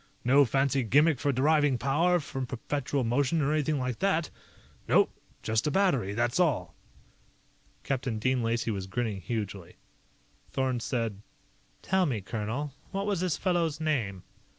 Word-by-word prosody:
No 140 Hz, +3 st, +6 dB
fancy 135 Hz, +2 st, +1 dB
gimmick 145 Hz, +5 st, +3 dB
for 140 Hz, -, +1 dB
deriving 145 Hz, 0 st, +3 dB
power 160 Hz, +8 st, +2 dB
from 135 Hz, -4 st, -5 dB
perpetual 135 Hz, +2 st, -2 dB
motion 135 Hz, +7 st, +1 dB
or 150 Hz, 0 st, +1 dB
anything 155 Hz, 0 st, +1 dB
like 125 Hz, -3 st, -3 dB
that. 170 Hz, -5 st, +1 dB, 0.6 s
Nope. -, -, +4 dB, 0.3 s
Just 110 Hz, +4 st, 0 dB
a -, -, +3 dB
battery, 140 Hz, -, +1 dB
that's 120 Hz, +7 st, 0 dB
all." 135 Hz, -, +1 dB, 1.1 s
Captain 130 Hz, -4 st, -2 dB
Dean 130 Hz, +3 st, +1 dB
Lacey 115 Hz, 0 st, 0 dB
was 95 Hz, -2 st, -4 dB
grinning 105 Hz, -1 st, -2 dB
hugely. 100 Hz, -4 st, -5 dB, 0.7 s
Thorn 130 Hz, -2 st, -1 dB
said: 115 Hz, -4 st, -2 dB, 0.6 s
"Tell 190 Hz, -1 st, +2 dB
me, 120 Hz, -7 st, -1 dB
colonel 110 Hz, +8 st, -4 dB, 0.2 s
what 195 Hz, 0 st, -3 dB
was 205 Hz, -4 st, 0 dB
this 180 Hz, -3 st, 0 dB
fellow's 170 Hz, -5 st, 0 dB
name?" 115 Hz, -, -1 dB
135 Hz, 145 wpm, -29 LUFS, 115-155 Hz, 1.1 s, No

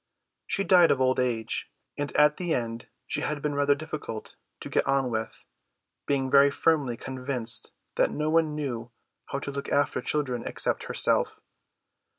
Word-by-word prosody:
She 195 Hz, -, +1 dB
died 175 Hz, -2 st, +6 dB
of 130 Hz, -, +2 dB
old 130 Hz, 0 st, +2 dB
age, 120 Hz, -3 st, -1 dB, 0.3 s
and 145 Hz, 0 st, -3 dB
at 150 Hz, 0 st, +4 dB
the 175 Hz, -3 st, 0 dB
end 115 Hz, -1 st, -4 dB, 0.2 s
she -, -, -1 dB
had 150 Hz, -1 st, -2 dB
been 150 Hz, 0 st, -2 dB
rather 145 Hz, 0 st, +3 dB
difficult 150 Hz, -7 st, -6 dB, 0.3 s
to -, -, -5 dB
get -, -, 0 dB
on 135 Hz, -2 st, +1 dB
with; 110 Hz, 0 st, -4 dB, 0.6 s
being 135 Hz, -2 st, 0 dB
very 140 Hz, 0 st, +7 dB
firmly 140 Hz, -5 st, +1 dB
convinced 125 Hz, -4 st, -2 dB, 0.3 s
that -, -, +4 dB
no 150 Hz, +1 st, -1 dB
one 160 Hz, -2 st, +2 dB
knew 125 Hz, -6 st, -4 dB, 0.4 s
how -, -, -3 dB
to 140 Hz, 0 st, -4 dB
look 140 Hz, 0 st, -5 dB
after 145 Hz, -3 st, +1 dB
children 130 Hz, -4 st, -1 dB
except -, -, -1 dB
herself. -, -, +1 dB
140 Hz, 165 wpm, -27 LUFS, 125-150 Hz, 0.6 s, very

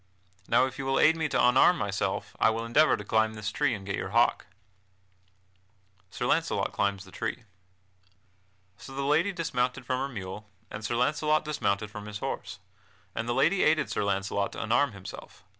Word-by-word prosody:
Now -, -, +4 dB
if 130 Hz, 0 st, -7 dB
you 135 Hz, -, -3 dB
will 135 Hz, -, +2 dB
aid 160 Hz, +1 st, +5 dB
me 160 Hz, -2 st, -1 dB
to -, -, 0 dB
unarm 130 Hz, +8 st, +5 dB
myself, 100 Hz, -1 st, -2 dB
I -, -, +5 dB
will 115 Hz, +1 st, -2 dB
endeavor 150 Hz, +7 st, +4 dB
to 105 Hz, -, -7 dB
climb 110 Hz, +1 st, +1 dB
this 105 Hz, -1 st, -4 dB
tree 135 Hz, -3 st, +1 dB
and 100 Hz, -2 st, -9 dB
get 95 Hz, -, -2 dB
your 95 Hz, -, -4 dB
hawk." 115 Hz, +4 st, +2 dB, 1.6 s
[Sidenote: -, -, -27 dB
Sir -, -, -3 dB, 0.3 s
Launcelot -, -, -1 dB
climbs 100 Hz, -1 st, 0 dB
the 95 Hz, -, -15 dB
tree] 115 Hz, +4 st, -4 dB, 1.3 s
So 135 Hz, -, -11 dB
the 140 Hz, -, -2 dB
lady 155 Hz, +8 st, +2 dB
dismounted 130 Hz, -9 st, -2 dB
from 130 Hz, -, -1 dB
her 135 Hz, +1 st, -2 dB
mule, 105 Hz, -2 st, -7 dB, 0.2 s
and 105 Hz, -, -7 dB
Sir 115 Hz, +2 st, -1 dB
Launcelot 150 Hz, +5 st, +1 dB
dismounted 105 Hz, -8 st, -1 dB
from 105 Hz, 0 st, -8 dB
his 105 Hz, 0 st, -5 dB
horse, -, -, -5 dB, 0.6 s
and 115 Hz, +2 st, -3 dB
the 120 Hz, -, 0 dB
lady 185 Hz, +3 st, +3 dB
aided 155 Hz, 0 st, +2 dB
Sir -, -, -1 dB
Launcelot 100 Hz, 0 st, -1 dB
to -, -, -4 dB
unarm 120 Hz, +3 st, +2 dB
himself. 95 Hz, -2 st, -11 dB
120 Hz, 190 wpm, -28 LUFS, 105-145 Hz, 1.6 s, aid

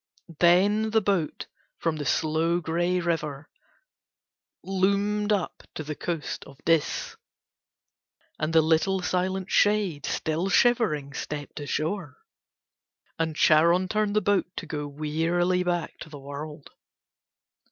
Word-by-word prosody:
Then 200 Hz, +5 st, +4 dB
the 220 Hz, 0 st, +3 dB
boat 195 Hz, -6 st, -1 dB, 0.3 s
from 165 Hz, -2 st, -1 dB
the 145 Hz, -2 st, -4 dB
slow, 160 Hz, +4 st, +1 dB
grey 175 Hz, +2 st, 0 dB
river 160 Hz, -4 st, -3 dB, 1.1 s
loomed 200 Hz, +2 st, +1 dB
up 200 Hz, -5 st, -1 dB
to 155 Hz, -, -4 dB
the 150 Hz, +1 st, -4 dB
coast 165 Hz, 0 st, -4 dB
of 140 Hz, -, -14 dB
Dis 165 Hz, -3 st, +1 dB, 1.2 s
and 155 Hz, +1 st, -1 dB
the 160 Hz, -1 st, +5 dB
little, 175 Hz, +4 st, +2 dB
silent 185 Hz, +1 st, -1 dB
shade 205 Hz, -8 st, +2 dB
still 160 Hz, +4 st, -1 dB
shivering 195 Hz, -, +2 dB
stepped 145 Hz, 0 st, -6 dB
ashore, 155 Hz, +1 st, -3 dB, 1.0 s
and 160 Hz, -1 st, -1 dB
Charon 170 Hz, +5 st, +4 dB
turned 210 Hz, 0 st, 0 dB
the 215 Hz, -, +4 dB
boat 205 Hz, -3 st, +2 dB
to -, -, -5 dB
go 150 Hz, -2 st, -4 dB
wearily 165 Hz, +5 st, 0 dB
back 175 Hz, -2 st, -2 dB
to 160 Hz, -, -9 dB
the 150 Hz, -, -9 dB
world. 145 Hz, +1 st, -8 dB
170 Hz, 120 wpm, -26 LUFS, 155-190 Hz, 1.2 s, the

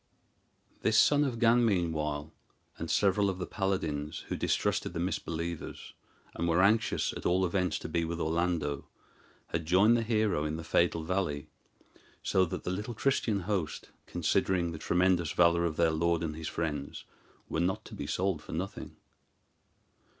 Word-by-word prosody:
This 110 Hz, 0 st, +3 dB
son 145 Hz, 0 st, +5 dB
of 130 Hz, -5 st, -1 dB
Gan, 120 Hz, +1 st, +4 dB
meanwhile, 80 Hz, -7 st, 0 dB, 0.5 s
and -, -, -4 dB
several 100 Hz, 0 st, +3 dB
of 95 Hz, -, -3 dB
the 90 Hz, -, -3 dB
paladins, 80 Hz, -7 st, -2 dB
who -, -, -1 dB
distrusted -, -, 0 dB
the 85 Hz, -, -3 dB
misbelievers, 85 Hz, -2 st, -4 dB, 0.4 s
and 85 Hz, -, -2 dB
were 85 Hz, +2 st, +3 dB
anxious 110 Hz, +3 st, +2 dB
at -, -, -7 dB
all 95 Hz, +2 st, +2 dB
events 90 Hz, 0 st, 0 dB
to -, -, -6 dB
be 85 Hz, -1 st, 0 dB
with 85 Hz, +1 st, -3 dB
Orlando, 80 Hz, -4 st, -1 dB, 0.6 s
had 80 Hz, -2 st, -3 dB
joined 100 Hz, +7 st, +5 dB
the 120 Hz, -, +2 dB
hero 110 Hz, -8 st, +1 dB
in 75 Hz, 0 st, -2 dB
the 80 Hz, -, -6 dB
fatal 85 Hz, 0 st, +1 dB
valley; 80 Hz, -4 st, -2 dB, 0.7 s
so 95 Hz, -1 st, +3 dB
that 80 Hz, -, -5 dB
the 90 Hz, -, -2 dB
little 105 Hz, +5 st, -4 dB
Christian 110 Hz, -5 st, +1 dB
host, 90 Hz, -4 st, -3 dB, 0.2 s
considering 90 Hz, -3 st, +1 dB
the 80 Hz, -, -7 dB
tremendous 90 Hz, -1 st, +2 dB
valor 85 Hz, 0 st, +4 dB
of 80 Hz, -2 st, -2 dB
their 85 Hz, -1 st, +4 dB
lord 85 Hz, +1 st, +1 dB
and 80 Hz, -2 st, -3 dB
his 80 Hz, 0 st, -5 dB
friends, 75 Hz, -4 st, -4 dB, 0.4 s
were -, -, -2 dB
not 90 Hz, +3 st, 0 dB
to -, -, -11 dB
be -, -, -5 dB
sold 95 Hz, -4 st, 0 dB
for -, -, -9 dB
nothing. 90 Hz, +5 st, -5 dB
85 Hz, 165 wpm, -30 LUFS, 80-95 Hz, 0.7 s, son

